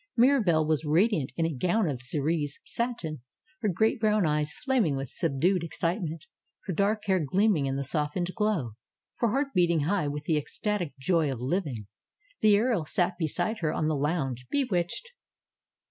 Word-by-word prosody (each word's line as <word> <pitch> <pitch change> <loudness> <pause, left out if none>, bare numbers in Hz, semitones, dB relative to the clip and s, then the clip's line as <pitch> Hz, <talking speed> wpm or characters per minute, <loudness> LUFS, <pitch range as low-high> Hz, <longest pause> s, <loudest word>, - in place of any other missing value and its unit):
Mirahelle 225 - +4
was 155 -1 +1
radiant 160 - +2
in 165 - +1
a 165 - -1
gown 180 - +1
of 135 -5 -3
cerise 145 +2 -1
satin; 205 - -3 0.4
her 215 - +1
great 220 +7 +1
brown 215 -3 +2
eyes 150 -1 0
flaming 240 - 0
with 135 -1 -4
subdued 170 +6 +1
ex 170 - -6
citement; 165 -2 -2 0.4
her 190 - -2
dark 205 +4 0
hair 190 -4 +2
gleaming 185 -1 +2
in 135 - -1
the 140 - -2
softened 150 +5 -1
glow; 210 - 0 0.5
her 235 - +2
heart 275 +5 0
beating 170 -3 +3
high 175 +1 0
with 145 +1 -4
the 160 0 +1
ecstatic 175 -1 -3
joy 155 +1 +1
of 130 - -5
living. 130 - -2 0.5
The 210 -2 +5
earl 225 -5 +1
sat 175 +3 0
beside 175 +7 -1
her 155 -3 0
on 155 - -1
the 155 - +1
lounge, 135 -4 -2
bewitched. 250 - -1
170 Hz, 170 wpm, -28 LUFS, 150-210 Hz, 0.5 s, The